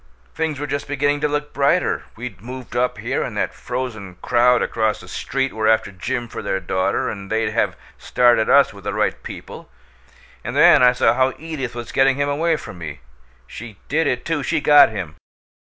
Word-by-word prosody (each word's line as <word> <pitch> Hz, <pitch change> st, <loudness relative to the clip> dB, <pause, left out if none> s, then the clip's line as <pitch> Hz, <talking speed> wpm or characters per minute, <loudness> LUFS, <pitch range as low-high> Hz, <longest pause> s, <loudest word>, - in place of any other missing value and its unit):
Things 160 Hz, -3 st, -2 dB
were 145 Hz, -, -3 dB
just 140 Hz, -1 st, -4 dB
beginning 145 Hz, +1 st, 0 dB
to 150 Hz, -, +2 dB
look 150 Hz, 0 st, -3 dB
brighter 140 Hz, +6 st, +1 dB
we'd 110 Hz, -6 st, -8 dB
moved 125 Hz, +1 st, -9 dB
up 125 Hz, +1 st, 0 dB
here, -, -, -2 dB
and -, -, -4 dB
that -, -, -1 dB
frozen 110 Hz, -8 st, -5 dB
crowd 125 Hz, 0 st, +3 dB
across 110 Hz, -2 st, -1 dB
the 90 Hz, -, -13 dB
street 135 Hz, +7 st, -2 dB
were 110 Hz, 0 st, -1 dB
after 110 Hz, -2 st, +2 dB
Jim 120 Hz, +6 st, -4 dB
for -, -, -7 dB
their 95 Hz, -, -2 dB
daughter, 95 Hz, +1 st, -1 dB
and 100 Hz, -2 st, -6 dB
they'd 110 Hz, 0 st, 0 dB
have -, -, 0 dB, 0.2 s
started 120 Hz, -3 st, +3 dB
us 140 Hz, -4 st, +5 dB
with 100 Hz, -1 st, -13 dB
the -, -, -2 dB
right -, -, 0 dB
people -, -, -10 dB, 0.7 s
and 120 Hz, -, -5 dB
then 150 Hz, -1 st, +6 dB
I 125 Hz, 0 st, +6 dB
saw 125 Hz, -, +3 dB
how 130 Hz, 0 st, +1 dB
Edith 150 Hz, -7 st, -5 dB
was 120 Hz, -1 st, -7 dB
getting 135 Hz, 0 st, +3 dB
him 145 Hz, +1 st, 0 dB
away 160 Hz, +3 st, +1 dB
from 90 Hz, -, -9 dB
me. 75 Hz, -4 st, -7 dB, 0.4 s
She 110 Hz, -, -10 dB
did 160 Hz, +3 st, +1 dB
it, 125 Hz, -, -2 dB
too! 165 Hz, -2 st, -1 dB
She 160 Hz, +3 st, 0 dB
got 145 Hz, -3 st, +7 dB
him! 95 Hz, -8 st, -6 dB
125 Hz, 200 wpm, -21 LUFS, 110-145 Hz, 0.7 s, got